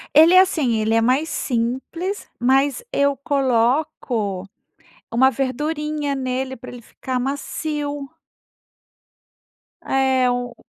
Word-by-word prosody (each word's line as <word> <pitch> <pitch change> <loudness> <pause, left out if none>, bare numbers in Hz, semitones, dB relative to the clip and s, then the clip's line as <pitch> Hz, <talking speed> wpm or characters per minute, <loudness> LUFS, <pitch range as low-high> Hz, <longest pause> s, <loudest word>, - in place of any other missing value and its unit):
Ele 320 +4 +8
é 370 - +9
assim, 305 -11 +2
ele 220 +1 +1
é 225 - +4
mais 265 +7 +1
simples, 265 - -3
mas 270 - +2
eu 280 0 +2
coloco 245 -6 0 0.7
uma 260 +3 +4
verdurinha 295 +3 -2
nele, 260 0 -3
pra 255 - -10
ele 245 - -10
ficar 255 +2 -5
macio. 285 +2 -3 1.8
É, 265 -1 +2
o 245 -1 -3
265 Hz, 105 wpm, -21 LUFS, 245-295 Hz, 1.8 s, é